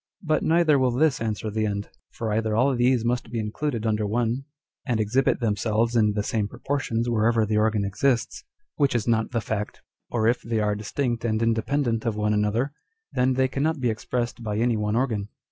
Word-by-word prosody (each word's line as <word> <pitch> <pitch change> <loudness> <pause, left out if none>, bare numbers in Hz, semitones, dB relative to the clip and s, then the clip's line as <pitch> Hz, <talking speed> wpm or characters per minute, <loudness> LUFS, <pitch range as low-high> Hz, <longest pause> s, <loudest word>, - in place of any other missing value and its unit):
But 155 -2 +1
neither 160 -3 +4
will 130 -1 +3
this 135 +3 +2
answer 110 -1 -2
the 110 0 0
end. 100 0 -3 0.2
For 110 -2 -3
either 110 0 0
all 130 +4 +3
these 120 -1 +2
must 120 -1 -1
be 115 - -4
included 115 +2 -2
under 105 -1 +1
one, 120 +4 -1 0.4
and 120 -5 -1
exhibit 120 +5 +2
themselves 110 +1 0
in 105 -2 +3
the 105 0 -1
same 105 -1 -1
proportions 120 -1 -2
wherever 115 -1 +2
the 105 0 0
organ 105 -1 +2
exists, 115 +5 0 0.3
which 140 -4 +2
is 115 -2 0
not 110 -1 +2
the 115 -2 -1
fact; 105 -1 -4 0.3
or 110 -2 +1
if 120 +1 +2
they 115 -1 -1
are 105 -1 +1
distinct 115 +4 -2
and 110 -1 0
independent 115 +1 0
of 110 - 0
one 105 0 +1
another, 110 +6 0 0.4
then 130 +1 +2
they 130 0 +3
cannot 145 +4 -1
be 125 -3 +1
expressed 120 +2 -3
by 105 -2 -3
any 120 +1 +2
one 105 0 -1
organ. 110 -5 0
115 Hz, 195 wpm, -25 LUFS, 105-125 Hz, 0.4 s, neither